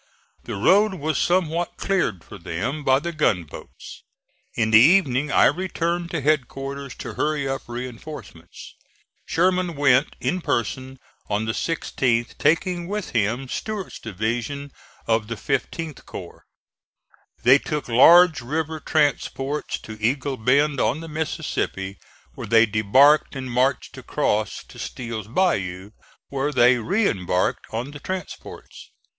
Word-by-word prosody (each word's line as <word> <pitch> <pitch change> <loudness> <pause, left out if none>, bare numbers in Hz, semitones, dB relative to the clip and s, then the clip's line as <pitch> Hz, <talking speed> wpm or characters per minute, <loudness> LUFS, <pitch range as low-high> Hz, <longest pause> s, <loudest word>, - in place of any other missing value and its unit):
The - - -5
road 195 - +3
was 155 -3 -1
somewhat 175 -1 0
cleared 175 - -1
for - - -12
them 130 - -4
by 130 -1 +4
the 170 +5 -3
gunboats. 100 - -3 0.5
In 110 -2 +1
the 110 - +8
evening 145 -1 +4
I - - +5
returned 170 +1 -1
to 165 -4 -3
headquarters 140 -2 -2
to - - -7
hurry 150 -2 -1
up 135 -2 -4
reinforcements. 120 - -9 0.5
Sherman 180 0 +1
went 140 -1 +3
in 185 - -1
person 130 +1 -2 0.3
on 105 +1 0
the 110 - 0
16th, 120 -5 -1
taking 175 +1 +1
with 205 0 -4
him 120 +4 0
Stuart's 210 +7 -5
division 120 +7 -3 0.3
of 110 -1 +1
the 115 - -4
15th 155 +5 -3
corps. - - -10 1.0
They 130 +4 +7
took 150 0 -4
large 160 +7 +6
river 155 +5 -3
transports 145 -1 -1
to 110 -1 -10
Eagle 130 +4 0
Bend 140 +5 +2
on 145 +5 +1
the 165 - -8
Mississippi, 100 -10 -3 0.3
where - - -7
they 115 0 +5
debarked 120 +9 +4
and 130 -2 -5
marched 130 +3 0
across 105 -1 -1
to - - -15
Steel's 115 -4 -6
Bayou, 100 - -1 0.4
where 140 +1 -1
they 125 -2 +4
re 195 - +1
embarked 90 -2 -1
on 120 +5 -4
the 145 - -9
transports. 185 +1 -8
135 Hz, 130 wpm, -23 LUFS, 115-160 Hz, 1.0 s, the